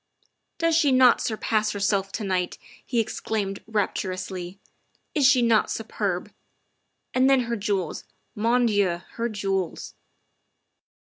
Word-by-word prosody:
" - - -53
Does 330 -1 +2
she 300 -4 +4
not 255 -1 +5
surpass 215 -1 0
herself 200 -1 0
to 220 - -3
night?" 185 -2 -1 0.3
he 240 - -1
ex 220 - -2
claimed 200 -3 -3
rapturously. 185 -3 -3 0.3
" - - -43
Is 285 -4 +4
she 260 -3 +5
not 230 -2 +3
superb? 205 -5 -3 0.8
And 260 +1 +4
then 270 -1 +5
her 235 -1 -2
jewels. 200 -5 -2 0.3
Man 235 +3 +2
Dieu! 200 -6 +1
Her 235 0 -2
jewels. 195 -4 -3
210 Hz, 135 wpm, -25 LUFS, 195-235 Hz, 0.8 s, not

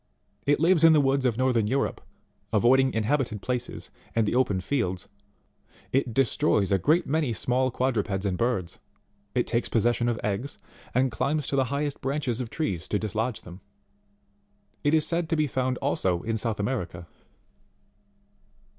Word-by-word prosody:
It 145 - +3
lives 165 0 +4
in 165 -1 +8
the 155 - +5
woods 135 -1 +2
of 120 -3 +1
northern 125 -4 +2
Europe, 135 +5 -1 0.5
avoiding 130 +5 +4
inhabited 110 0 0
places 125 +3 -4 0.2
and 115 -2 +2
the - - 0
open 125 -7 +2
fields; 95 -4 -2 0.8
it 135 -2 +1
destroys 110 -5 +2
a 95 - +3
great 165 - +3
many 150 -4 0
small 125 +4 0
quadrupeds 110 -6 -1
and 95 -2 0
birds; 95 -5 -1 0.6
it 125 - +2
takes 115 0 0
possession 120 +1 +2
of 115 - -1
eggs, 105 +7 -3 0.4
and 130 0 +3
climbs 145 +5 -1
to - - -1
the 135 -1 +3
highest 140 +2 -3
branches 135 -3 -1
of 120 - -5
trees 95 - -3
to 105 - 0
dislodge 110 +3 -2
them. 90 +2 -12 1.2
It 145 +2 +3
is 155 - +3
said 170 -1 -1
to 165 - +2
be 155 -1 +2
found 130 -2 -1
also 90 -2 0
in 115 0 -1
South 110 -1 -2
America. 100 -6 -3
125 Hz, 160 wpm, -26 LUFS, 110-140 Hz, 1.2 s, in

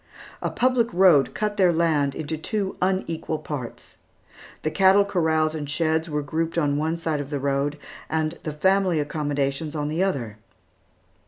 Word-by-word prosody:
A - - -1
public 245 -2 +1
road 175 -6 +4
cut 210 +1 -2
their 185 -3 +5
land 155 -4 +1
into 160 0 -3
two 195 +5 -2
unequal 180 -4 -1
parts. 140 -6 -7 0.7
The 155 - 0
cattle 195 +2 +5
corrals 160 -5 +1
and 150 -3 -5
sheds 160 +1 0
were 150 -1 -2
grouped 160 +3 -2
on 145 -3 +2
one 160 +3 -1
side 160 -3 -1
of 140 - -7
the 145 -1 -2
road, 140 +1 -1 0.3
and 160 +1 -1
the 155 - -4
family 190 +2 +2
accommodations 145 0 -2
on 150 -1 -2
the 160 +4 -1
other. 125 - -1
160 Hz, 160 wpm, -24 LUFS, 145-180 Hz, 0.7 s, their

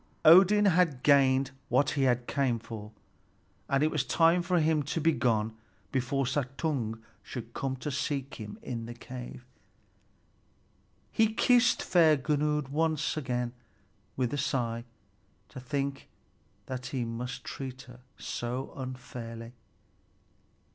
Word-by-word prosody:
Odin 195 +5 +8
had 170 -8 +3
gained 135 -2 +4 0.2
what 140 - +3
he 135 -3 +3
came 130 -4 +1
for, 110 -2 -8 0.8
and 140 +1 +2
it 155 - +2
was 150 -5 +1
time 165 +5 +3
for 175 0 +1
him 155 -1 +2
to 145 +4 -2
be 165 +1 +3
gone 110 -6 0 0.4
before 135 +1 0
Suttung 130 -3 -2 0.2
should 115 -1 -8
come 135 -1 -2
to 130 +3 -5
seek 140 0 -2
him 105 -1 -7
in 115 -2 -5
the 120 - -7
cave. 125 0 -9 1.7
He 220 -1 +3
kissed 245 +2 +4
fair 160 -4 +5
Gunnlöd 150 0 0
once 155 +1 0
again, 125 -5 -2 0.6
with 125 -1 0
a 145 - -1
sigh 120 -4 -1 0.6
to - - -9
think 135 +1 -3 0.6
that 130 0 -5
he 130 -2 -2
must 125 +3 -5
treat 130 -1 -6
her 125 -1 -14 0.2
so 125 +3 -4
unfairly. 120 -3 -7
135 Hz, 125 wpm, -29 LUFS, 125-150 Hz, 1.7 s, Odin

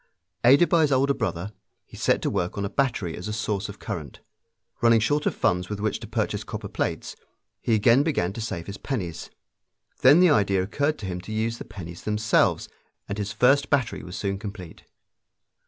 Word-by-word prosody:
Aided 140 +8 +6
by 170 - +3
his 150 -2 +2
older 135 +1 +3
brother, 105 -6 -3 0.3
he - - -15
set - - +1
to - - +1
work 90 +2 -2
on 100 - -1
a 100 - -4
battery 115 -10 0
as 90 - -7
a 105 - -3
source 105 -2 -2
of 100 - -8
current. 85 - -6 0.6
Running 115 -1 +5
short 145 +7 +1
of - - 0
funds 90 +1 0
with 105 -1 -4
which 105 0 -1
to - - -8
purchase - - -2
copper - - -6
plates, - - -3 0.5
he 115 - +2
again 115 +5 +5
began 140 - 0
to 115 - -6
save 95 -7 -4
his 100 0 -8
pennies. 95 - -4 0.7
Then 140 +6 +7
the 180 -2 +6
idea 100 -6 +3
occurred 145 +10 -1
to 105 - -7
him 90 -1 -4
to 100 - -9
use 115 +2 -1
the - - -7
pennies 85 -3 -9
themselves, 105 -1 +1 0.4
and 100 +1 -4
his 105 0 -3
first 135 +3 +3
battery 125 - 0
was 90 - -8
soon 100 -1 -2
complete. 100 -5 -9
105 Hz, 200 wpm, -25 LUFS, 95-130 Hz, 0.7 s, Then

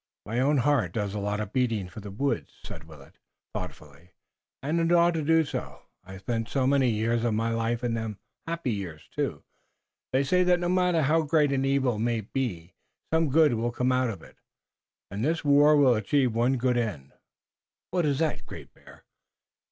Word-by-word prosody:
"My 115 +4 -2
own 145 +3 +3
heart 130 -9 +1
does 105 -3 -2
a 105 - -3
lot 105 +1 -2
of 105 -2 -5
beating 115 -7 0
for 90 +4 -10
the 105 -1 -8
woods," 120 +4 -2
said 80 - -9
Willet, 75 -4 -16 0.3
thoughtfully, 75 +5 -9 0.5
"and 155 +4 0
it 165 0 +1
ought 175 0 +4
to 165 - -1
do 160 +1 +3
so, - - -6 0.2
I've 95 +1 -11
spent 115 +2 -3
so 135 -2 0
many 135 -1 +3
years 115 +1 0
of 115 -3 +1
my 115 +1 0
life 115 +1 -1
in 120 -1 0
them 110 -3 -4 0.3
happy 165 -6 -2
years, 90 -8 -6
too. - - -2 0.7
They 130 +2 +2
say 180 +6 +2
that 180 0 +3
no 175 0 -1
matter 180 -3 +2
how 160 +4 +3
great 150 -1 +2
an 135 -1 0
evil 135 -5 +1
may 115 0 0
be 95 -7 -4 0.4
some 160 -2 +2
good 155 -1 +4
will 115 +1 -1
come 125 +2 0
out 130 -1 +1
of 95 -7 -7
it, - - -17 0.7
and 100 +3 -4
this 160 +2 -1
war 145 +1 +6
will 135 -3 +5
achieve 120 +3 +1
one 120 +4 +1
good 125 0 +1
end." 105 - -3 0.8
"What 180 -1 +1
is 140 -2 +1
that, 160 0 -2
Great - - -11
Bear?" - - -18
125 Hz, 195 wpm, -27 LUFS, 110-145 Hz, 0.8 s, war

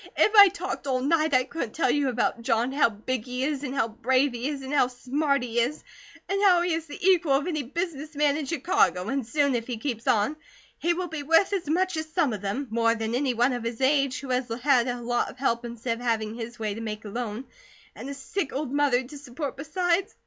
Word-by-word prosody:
"If 425 - +4
I 405 -1 +11
talked 370 -5 -4
all 260 -1 +1
night 310 +3 +2
I 255 - +4
couldn't 255 -4 -5
tell 325 - +2
you 285 -2 +1
about 240 -1 -1
John. 230 +1 +1
How 275 -3 +3
big 220 +3 -4
he 250 0 -3
is, 285 -1 -1
and 265 -1 -4
how 265 - +1
brave 255 +5 +1
he 240 +2 -3
is, 280 -2 -5
and 265 +2 -5
how 280 -4 +4
smart 275 +2 -1
he 240 -1 -1
is, 250 +6 -1 0.4
and 395 0 -1
how 360 -4 +5
he 350 -1 0
is 325 0 -3
the 290 - -8
equal 350 -6 +4
of 275 +1 +2
any 320 -4 -1
business 305 +2 -4
man 290 -1 +2
in 300 -2 -3
Chicago, 260 - +1
and 270 -3 -2
soon, 285 +2 +2
if 230 -2 -2
he 245 -3 -3
keeps 230 -1 -4
on, 225 +8 +2 0.4
he 345 +1 +1
will 360 +1 -3
be 320 -3 -5
worth 330 +7 +3
as 360 -7 -2
much 365 +2 +1
as 315 0 -4
some 315 -9 +2
of 205 - -5
them 205 +8 -2
more 230 0 +2
than 225 0 -3
any 255 0 0
one 245 +3 +2
of 245 -2 -4
his 230 0 -4
age, 275 -1 +2
who 275 - -8
has 250 -1 -1
had 260 -4 +4
a 245 0 -2
lot 240 0 -1
of - - -12
help 240 -3 0
instead 235 0 -4
of - - -9
having 220 -2 0
his 235 +1 -7
way 215 -3 -2
to 225 - -7
make 215 -1 -5
alone, 225 +3 -4 0.5
and 270 - -7
a 280 - -5
sick 290 +5 -3
old 275 -1 -3
mother 285 -3 +2
to 285 +4 -10
support 275 +1 -5
besides. 355 +6 -1
270 Hz, 245 wpm, -26 LUFS, 235-305 Hz, 0.5 s, I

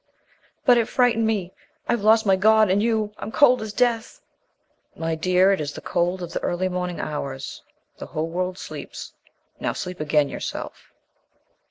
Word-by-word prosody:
"But 245 -2 +6
it 230 - 0
frightened 235 -3 +2
me. 195 -5 -1 0.3
I've 235 - +1
lost 220 +2 +4
my 195 -1 +5
God 215 +1 +4
and 200 +2 +3
you 220 -2 0
I'm - - -6
cold 255 -2 +5
as 220 -1 -5
death!" 235 - 0 0.8
"My 165 0 -2
dear, 185 +4 +3
it 195 - +1
is 145 -1 -4
the - - -8
cold 175 +1 -1
of 170 - -7
the - - -2
early 185 +2 -1
morning 180 -1 -3
hours. 140 -3 -5 0.4
The - - -7
whole 155 +1 -2
world 180 +1 -2
sleeps. - - -8 0.5
Now - - -1
sleep 180 0 -6
again 150 -1 +2
yourself." - - -7
190 Hz, 170 wpm, -23 LUFS, 175-220 Hz, 0.8 s, But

